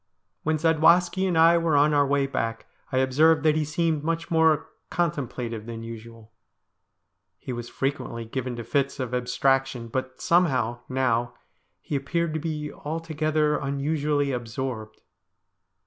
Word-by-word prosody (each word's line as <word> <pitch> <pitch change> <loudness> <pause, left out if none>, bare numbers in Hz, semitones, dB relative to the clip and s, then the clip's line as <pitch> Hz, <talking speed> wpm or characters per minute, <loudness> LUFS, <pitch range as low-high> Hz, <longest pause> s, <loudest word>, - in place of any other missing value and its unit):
When 155 0 0
Zadwaski 170 +4 +3
and 175 -3 0
I 165 +1 +6
were 165 -2 +1
on 150 +1 +4
our 145 -1 +3
way 140 0 +2
back, 115 -4 -3 0.3
I 130 - 0
observed 150 +4 +4
that 155 -1 +4
he 155 - +1
seemed 155 0 0
much 165 +2 -2
more 160 -2 +3 0.2
contem 150 -7 -1
plative 115 -3 -5
than 115 -1 -6
usual. 115 -1 -10 1.1
He 125 - -6
was 120 0 -6
frequently 135 -4 -3
given 125 +1 -4
to 120 - -6
fits 140 +4 -1
of 125 -2 -3
abstraction, 125 0 0
but 130 +1 -4
somehow, 130 -9 +2
now, 120 -2 0 0.5
he 150 - -4
appeared 170 +4 -1
to 155 - -1
be 150 -2 -4
altogether 155 -1 -1
unusually 145 +1 0
absorbed. 120 -2 -5
140 Hz, 145 wpm, -25 LUFS, 125-155 Hz, 1.1 s, I